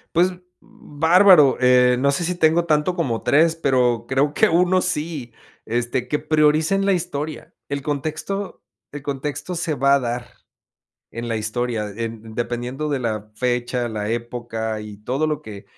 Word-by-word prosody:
Pues, 180 +2 +4
mm, - - -10 0.3
bárbaro, 160 -1 +4
eh, 125 0 +5
no 140 +1 +2
sé, 140 +5 0
si 180 +1 -1
tengo 165 0 +3
tanto 155 +2 +1
como 125 -10 -1
3, 165 +3 +3
pero, 125 -6 +1
creo 140 +2 +1
que - - +4
1 180 +2 +3
sí, 150 -9 -3 0.3
este, 120 +2 -2
que 150 - -1
prioricen 155 +5 +2
la 200 - +3
historia. 160 -4 -4
El 140 -1 -3
contexto 155 +7 -4 0.3
el 145 -1 -7
contexto 145 +5 -4
se 165 -2 -2
va 140 +1 +4
a - - +2
dar 120 0 -4 0.9
en 120 +1 -5
la 115 - -1
historia, 110 0 -2
en 115 -1 -6
dependiendo 120 +5 -3
de 140 -2 0
la 110 -3 -3
fecha, 125 0 -1
la 105 -2 -4
época 115 -2 -4
y 105 -1 -9
todo 140 +5 0
lo 150 0 -3
que 100 -2 -10
140 Hz, 165 wpm, -21 LUFS, 120-155 Hz, 0.9 s, eh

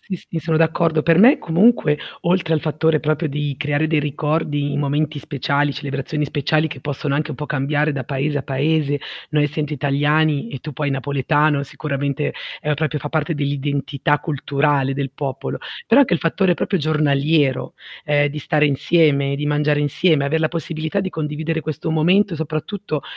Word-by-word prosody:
Sì, 190 - -5
sì, 165 - -6
sono 160 0 0
d'accordo. 160 -1 +2
Per 165 +1 +4
me 245 +8 +7
comunque 165 -4 +3 0.2
oltre 175 -2 +1
al 155 - +1
fattore 155 0 +1
proprio 155 +1 0
di 145 0 -2
creare 145 +1 0
dei 160 -1 +1
ricordi, 145 0 -1
momenti 145 +1 -1
speciali, 145 0 -1
celebrazioni 140 +1 -3
speciali 150 +2 0
che 135 - -8
possono 145 0 -3
anche 155 +2 -1
un 145 - -5
po' 150 - -5
cambiare 145 +2 0
da 135 -2 -4
paese 145 +3 -1
a 140 - -4
paese, 145 +1 0 0.3
noi 150 0 +2
essendo 150 +1 -2
italiani 145 0 +1
e 135 - -5
tu 155 - -7
poi 145 +1 -2
napoletano 145 +2 +1
sicuramente, 140 0 -3 0.3
ehm, 150 -1 0
proprio 155 0 -2
fa 150 - -4
parte 155 +1 -1
dell'identità 145 0 -1
culturale 140 -2 0
del 140 -1 -3
popolo, 135 -2 -4 0.3
però 235 +5 +6
anche 245 -10 +3
il 170 - -1
fattore 175 +2 +2
proprio 190 +2 -1
giornaliero, 145 -3 +1 0.3
ehm, 145 -1 +3
di 150 +1 -6
stare 150 0 +2
insieme, 140 -1 +2
di 145 +1 -3
mangiare 150 0 +1
insieme, 145 +1 +2
aver 160 +3 0
la 155 - +2
possibilità 160 +2 -3
di 190 -1 -3
condividere 160 +1 -3
questo 155 +1 -4
momento 175 +4 +3
soprattutto 155 +1 -4
150 Hz, 170 wpm, -20 LUFS, 145-160 Hz, 0.3 s, me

